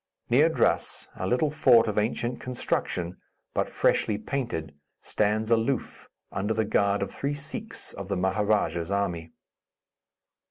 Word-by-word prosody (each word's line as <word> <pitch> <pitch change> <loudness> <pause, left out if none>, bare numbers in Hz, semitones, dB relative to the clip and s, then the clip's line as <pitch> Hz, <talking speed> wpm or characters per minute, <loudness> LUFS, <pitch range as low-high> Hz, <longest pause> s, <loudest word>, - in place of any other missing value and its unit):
Near - - +6
Drass, - - +1
a - - -3
little 145 +5 +2
fort 125 -7 +5
of 105 -1 +1
ancient 120 +3 -1
construction, 90 -8 -2 0.4
but - - 0
freshly 105 - +2
painted, 115 - -3 0.3
stands 110 +1 0
aloof, 115 +2 0 0.2
under 105 +3 -1
the 110 0 +1
guard 100 0 +2
of - - -6
three 140 +1 -2
Sikhs 155 +11 -6
of 100 - -7
the 100 -1 -1
Maharadja's 95 -3 +1
army. 90 -5 -1
105 Hz, 130 wpm, -27 LUFS, 100-125 Hz, 0.4 s, Near